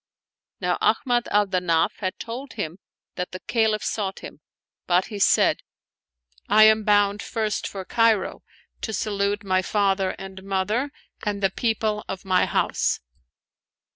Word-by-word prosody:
Now - - 0
Ahmad 245 -3 +2
al 205 0 +3
Danaf 180 -4 +1
had 185 -2 -3
told 250 +4 -7
him 175 -4 -5 0.4
that 180 0 -4
the 185 - -5
Caliph 220 -1 +1
sought 195 -3 -3
him; - - -10 0.5
but 180 +1 +3
he 205 - -4
said, - - +4 0.5
" - - -36
I 215 - +7
am 220 0 +6
bound 205 -1 +3
first 220 -2 -2
for 190 -2 -7
Cairo, 225 -3 +2 0.4
to 220 - -3
salute 205 0 -1
my 185 -1 +2
father 195 -1 +1
and 190 0 -9
mother 200 +8 -1 0.3
and 205 -1 -2
the 195 - +3
people 220 -1 -1
of 190 0 -6
my 185 -1 +3
house." - - 0
200 Hz, 145 wpm, -24 LUFS, 190-215 Hz, 0.5 s, I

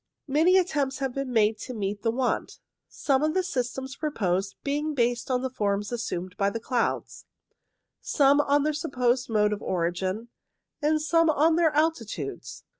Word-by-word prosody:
Many 320 +7 +4
attempts 290 -7 0
have 270 -2 -2
been 275 -1 -3
made 215 -2 +2
to 255 +1 -7
meet 205 -1 -3
the 225 - +1
want; 250 +2 -1 0.3
some 270 -2 0
of 310 +2 0
the 375 - +2
systems 265 -4 -3
proposed 195 - -1
being 295 +2 -1
based 240 -1 0
on 255 0 0
the 260 - -1
forms 205 -3 -1
assumed 185 -6 -4
by 200 0 +2
the 230 - -4
clouds, 240 +1 -2 0.8
some 285 0 +4
on 285 0 +2
their 305 +1 +1
supposed 255 -5 0
mode 210 -1 +2
of 210 - -5
origin, 185 +5 -2 0.5
and 310 +1 +2
some 330 +1 +3
on 315 +2 +3
their 335 -1 +4
alti 315 -6 +2
tudes. 135 - -7
255 Hz, 170 wpm, -26 LUFS, 210-295 Hz, 0.8 s, Many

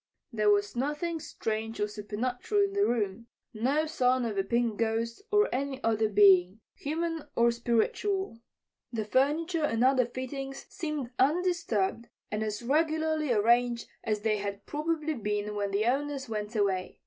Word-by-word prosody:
There 215 -2 +2
was 205 +1 +2
nothing 300 +6 -2
strange 225 -5 -4
or 210 - +1
supernatural 240 - -1
in 395 0 -1
the 405 +1 +3
room; 220 -1 -1 0.3
no 265 +8 +1
sign 255 -5 +1
of 220 -3 -2
a 195 - +1
pink 235 +1 0
ghost 230 - -1
or 415 0 +4
any 270 +1 -2
other 220 -1 +2
being, 195 -1 +5
human 325 +1 -3
or 235 0 +4
spiritual. 235 - 0 0.5
The 220 -3 -2
furniture 305 - +1
and 230 -5 +1
other 255 -2 +4
fittings 270 +2 -6
seemed 300 -7 -4
undisturbed 285 - +1 0.2
and 210 +1 -1
as 215 +1 -3
regularly 315 +1 +1
arranged 235 +2 +2 0.2
as 215 -2 -1
they 215 0 +1
had 200 0 -5
probably 310 +1 -1
been 210 -4 -2
when 205 -1 -1
the 200 +2 0
owners 275 +2 -1
went 215 0 -4
away. 195 -3 0
240 Hz, 150 wpm, -29 LUFS, 215-295 Hz, 0.5 s, being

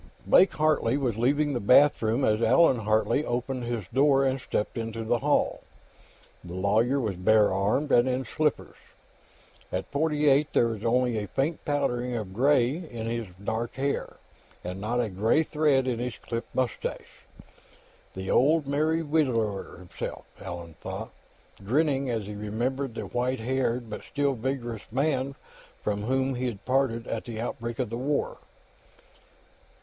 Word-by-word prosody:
Blake 190 - +5
Hartley 150 -5 +2
was 125 -6 -1
leaving 145 +6 +1
the 120 - -1
bathroom 125 +1 +4
as 110 +1 +2
Allan 130 +2 +5
Hartley 110 +6 +1
opened 125 -1 -2
his 120 -4 -3
door 135 +1 +4
and 130 0 0
stepped 105 - -2
into 115 0 -4
the 120 +2 +1
hall. 145 +1 +1 0.8
The 90 0 -8
lawyer 110 +8 +2
was 105 -7 -2
bare 105 +2 +4
armed 105 +10 0
and 120 +2 +5
in 130 +1 -1
slippers; 150 +5 -1 0.9
at 95 +1 -2
forty 150 +1 0
eight, 145 +2 +3
there 115 - +3
was 110 -2 -5
only 120 -1 +2
a 105 - -4
faint 145 - -1
powdering 125 -4 -1
of 105 -5 -5
gray 130 +3 +3
in 125 -11 -7
his 115 -1 -3 0.2
dark 110 +2 -3
hair, 140 +1 -2 0.5
and 90 +2 -5
not 115 +4 -1
a 120 - +1
gray 110 +10 +2
thread 150 -4 +2
in 120 -2 -1
his 125 0 -4
clipped 115 0 -6
mustache. 130 -4 -3 0.9
The 95 0 -4
old 150 +3 +4
Merry 155 +3 +1
Widower, 125 -10 0
himself, 90 0 -7 0.2
Allan 85 -2 -7
thought, - - -6 0.5
grinning 135 +4 +1
as 115 -4 -2
he 105 - -6
remembered 120 +5 -3
the - - -4
white 125 +1 -1
haired 125 -1 -1
but 105 - -6
still 140 -1 0
vigorous 120 -3 -4
man 135 +1 0 0.5
from 105 -1 -1
whom 130 +2 +1
he'd 125 -5 -4
parted 130 -3 +1
at 115 - -4
the 115 -2 -6
outbreak 115 0 -4
of 125 -4 -2
the 115 - -3
War. 140 +4 -1
125 Hz, 155 wpm, -27 LUFS, 110-140 Hz, 0.9 s, Blake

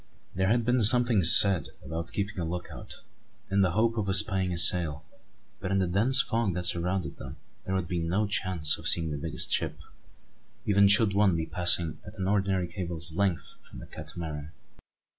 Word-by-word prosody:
There 95 +1 -2
had 115 +2 0
been 125 0 0
something 120 -1 +4
said 95 +2 +7 0.2
about 85 +1 -7
keeping 100 -1 -5
a - - -3
look 90 +2 -6
out, - - -11 0.5
in 100 0 +1
the 90 -3 0
hope 115 +3 -1
of 100 -3 -3
espying 95 -1 +2
a 85 - -4
sail; 80 -3 -1 0.5
but 95 - -6
in 100 - -1
the 95 - 0
dense 115 +10 +2
fog 115 -6 -3
that 90 -1 -4
surrounded 90 +2 -3
them - - -11 0.3
there 95 - -4
would 95 -3 -3
be 90 -1 -4
no 90 +6 -2
chance 95 -6 -1
of - - -7
seeing 80 -2 +1
the 75 - -5
biggest 80 +2 -4
ship, 80 -2 -2 0.9
even 100 -2 +3
should 105 0 +5
one 100 -3 +1
be 80 -1 -3
passing 85 0 +2
at - - -13
an 95 -1 -4
ordinary 95 -3 -1
cable's 85 -2 -5
length 95 -3 -3
from - - -13
the - - -11
Catamaran. 80 -1 -9
95 Hz, 190 wpm, -26 LUFS, 85-100 Hz, 0.9 s, said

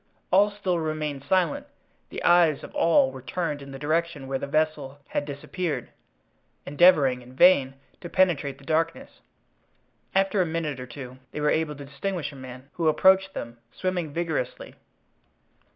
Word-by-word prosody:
All 200 +3 +5
still 195 -4 -2
remained 155 -3 -3
silent, 175 +1 +1 0.4
the - - -6
eyes 170 -4 +4
of - - -10
all 165 -5 +3
were 130 0 -9
turned 150 +3 -3
in 140 - -10
the 135 - -8
direction 155 0 -1
where 135 0 -2
the 140 - -4
vessel 150 -2 -1
had 145 - -2
disappeared, 150 +4 -4 0.7
endeavoring 145 -5 +4
in 125 +1 -15
vain 135 -5 +5 0.2
to 175 - -8
penetrate 160 -8 +1
the 140 - -18
darkness. 165 +2 -2 0.9
After 195 +1 +3
a - - +4
minute 160 -4 -3
or 125 - -7
two 130 +1 -9
they - - -4
were 150 0 +2
able 155 -2 0
to 140 0 -9
distinguish 150 +2 -4
a - - -13
man, 130 0 -10
who 165 -2 -1
approached 190 +4 +4
them, 120 0 -7
swimming 180 -4 -2
vigorously. 160 -6 -3
155 Hz, 160 wpm, -26 LUFS, 135-175 Hz, 0.9 s, All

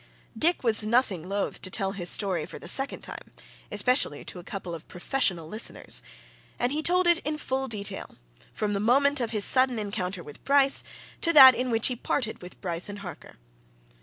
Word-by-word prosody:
Dick 340 0 +1
was 225 -3 +3
nothing 215 -6 0
loth 200 0 -3
to 185 - -2
tell 195 +1 -2
his 180 -3 -2
story 185 -7 0
for - - -10
the - - -11
second 270 +1 0
time - - -10 0.4
especially 250 - +1
to 180 - -7
a - - -12
couple 185 -2 -7
of 165 -1 -10
professional 180 -4 -1
listeners. 215 +7 -3 0.6
And 245 +1 -1
he 300 +2 -2
told 360 +3 +2
it 345 -1 +4
in 305 -1 -4
full 265 -2 -3
detail, 205 -4 -5 0.4
from 210 -1 -3
the 200 - -2
moment 275 +6 +2
of 235 - -2
his 210 -3 +3
sudden 255 -2 +5
encounter 200 -4 -4
with 145 - -14
Bryce 275 -1 +5 0.4
to 335 - +3
that 265 -4 +10
in 250 +1 -3
which 225 -1 0
he 250 - +1
parted 235 -1 -3
with 180 0 -12
Bryce 175 0 -4
and 205 - -7
Harker. 180 - -11
220 Hz, 195 wpm, -26 LUFS, 190-265 Hz, 0.6 s, that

